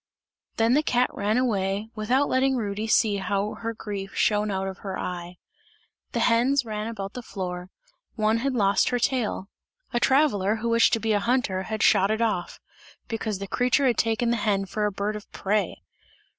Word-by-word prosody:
Then 225 +2 +3
the 295 - +4
cat 250 -4 +1
ran 210 +3 0
away, 210 -3 0
without 245 +6 +1
letting 265 +1 +2
Rudy 210 -2 -2
see 215 -2 +3
how 200 +2 -1
her 230 0 -4
grief 200 -3 -6
shone 210 0 +2
out 190 -1 -2
of 190 -1 -6
her 195 -2 -5
eye. 175 0 -5 0.8
The - - 0
hens 250 +3 +3
ran 215 -1 -4
about 200 -3 -5
the 250 - -6
floor; 180 -5 -5 0.5
one 215 0 +2
had 265 +2 -1
lost 200 -3 +3
her 245 - +1
tail; 240 -5 -1 0.5
a 240 - +2
traveller, 240 -7 +3
who 230 +1 -3
wished 230 +1 +4
to 225 - +3
be 225 0 0
a 205 - +3
hunter, 230 -4 0
had 220 -1 -1
shot 195 +1 +4
it 220 0 0
off, 210 -6 -1 0.5
because 220 -3 -2
the 200 +1 -6
creature 250 +6 +2
had 245 -3 +2
taken 230 +1 +1
the 235 - +1
hen 200 -2 0
for 210 +2 -1
a - - -2
bird 200 +2 -2
of 210 - -9
prey! 200 -2 -1
215 Hz, 190 wpm, -25 LUFS, 200-235 Hz, 0.8 s, the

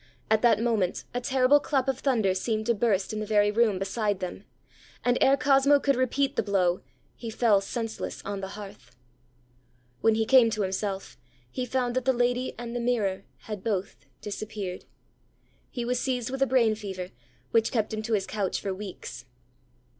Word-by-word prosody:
At 220 -1 +4
that 230 -3 +4
moment, 220 -6 0
a 245 - -2
terrible 265 +2 +4
clap 275 -2 0
of 265 -1 0
thunder 225 -9 +2
seemed 215 +3 -1
to 235 - +3
burst 205 -3 0
in 215 - -3
the 215 - -3
very 205 -1 +3
room 220 -2 +2
beside 200 +1 -1
them; 185 +2 -6 0.6
and 245 0 +3
ere 275 +1 +5
Cosmo 280 +1 +4
could 275 -1 +2
repeat 265 +2 0
the - - +2
blow, 190 -3 +1 0.3
he 230 - -7
fell 220 -3 +3
senseless 225 +2 -4
on 200 -1 -4
the 190 - -4
hearth. 200 -11 -11 1.0
When 225 -1 +3
he 220 0 +1
came 250 -1 +6
to 215 -2 -1
himself, 190 -4 -3 0.3
he 250 - -3
found 245 -1 -1
that 255 -1 0
the 265 - +4
lady 245 +1 0
and 240 0 -6
the - - -1
mirror 210 -6 0 0.2
had 210 -3 -7
both 185 - -3
disappeared. 205 -3 -5 0.8
He 240 -3 -4
was 245 +1 0
seized 250 -2 -2
with 270 0 -4
a 270 - +4
brain 240 -4 +3
fever, 190 -4 -6 0.4
which 225 -1 +3
kept 220 -3 0
him 215 - -2
to 225 +1 -3
his 200 -3 +1
couch 200 -4 -2
for 195 - -3
weeks. 185 -11 -8
220 Hz, 185 wpm, -27 LUFS, 200-245 Hz, 1.0 s, came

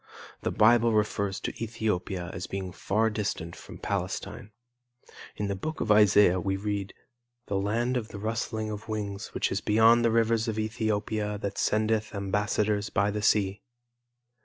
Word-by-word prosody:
The - - -1
Bible 115 +1 +4
refers 100 -2 0
to - - -3
Ethiopia 95 -6 -2
as 90 - -5
being 95 -1 -4
far 110 +5 0
distant 95 -6 -3
from - - -11
Palestine. 105 - -4 0.9
In 105 - -2
the 100 - -1
book 155 +12 -5
of 105 - 0
Isaiah 105 -3 +6
we 95 +2 -1
read 100 -1 -3 0.5
"the 100 - -1
land 115 +6 0
of 115 -3 -3
the 105 - -9
rustling 110 0 -3
of 105 +1 -7
wings 105 -1 -3
which - - 0
is 100 - -1
beyond 110 +2 +5
the 115 - +4
rivers 115 0 +2
of 110 -1 -2
Ethiopia 110 -1 -1
that 100 - -3
sendeth 110 0 +1
ambassadors 105 +1 0
by 100 +1 +1
the 105 +1 -3
sea." 100 -1 +2
105 Hz, 160 wpm, -28 LUFS, 100-110 Hz, 0.9 s, Isaiah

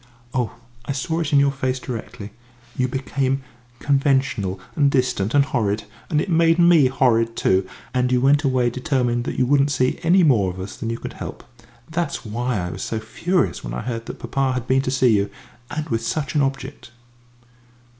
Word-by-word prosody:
Oh, 125 -3 -1 0.3
I 140 - -2
saw 160 +5 -2
it 160 -4 -2
in 145 - +5
your 140 0 +4
face 130 -1 -2
directly 110 -4 -7 0.4
you 125 - +1
became 135 +1 -1 0.3
conventional 135 -10 +1 0.2
and 145 -3 +4
distant 125 -5 0
and 140 -1 +5
horrid, 110 -6 -1 0.3
and 155 -4 +2
it - - -1
made 165 -1 +3
me 170 -5 +6
horrid 115 -3 +2
too; 95 -3 +2 0.3
and 125 0 +1
you 125 - +3
went 140 +3 +4
away 130 -3 +2
determined 125 -1 0
that - - -4
you 130 - +3
wouldn't 140 +2 +3
see 130 -3 0
any 175 +3 +4
more 115 - +4
of 90 +1 -7
us 95 +2 -6
than 115 - -4
you 115 - -2
could - - -7
help. - - -8 0.4
That's 165 -4 -3
why 120 +2 -2
I 90 -2 -3
was - - -7
so 110 - -2
furious 175 +11 -1
when - - -5
I - - -3
heard 115 -1 -4
that - - -6
papa 130 +2 -1
had 125 -2 -3
been 130 +1 +2
to 130 - -3
see 130 -3 +3
you, 100 0 +1 0.4
and 155 +1 -4
with 115 -1 0
such 140 +4 -2
an 150 - +2
object." 135 -1 -3
130 Hz, 195 wpm, -22 LUFS, 115-140 Hz, 0.4 s, me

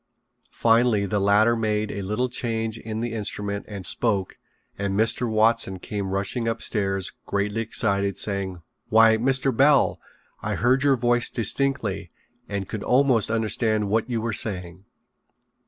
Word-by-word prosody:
Finally 115 -3 +2
the 105 +1 -1
latter 105 +4 +4
made 110 -2 -1
a 100 - -5
little 105 +6 -1
change 115 -2 -3
in 110 0 -5
the 120 -1 -3
instrument 105 -2 -3
and 100 -3 -7
spoke 100 -6 0 0.4
and 100 -1 -2
Mr. 115 +3 +1
Watson 110 -3 +2
came 100 +1 -5
rushing 100 +5 -1
upstairs 95 -4 -1 0.2
greatly 100 +2 -1
excited, 100 -3 0
saying: 95 -4 -1 0.3
"Why, 110 0 +6
Mr. 130 +2 +1
Bell, 140 +3 +3 0.4
I 105 0 -2
heard 125 +6 +2
your 140 -2 +3
voice 120 0 +2
distinctly 115 -6 -1 0.4
and 100 -2 -3
could 110 - -5
almost 125 -4 +2
understand 110 -1 0
what 110 +3 0
you 115 -2 -1
were 115 0 -2
saying." 95 -3 -4
110 Hz, 140 wpm, -24 LUFS, 100-115 Hz, 0.4 s, Why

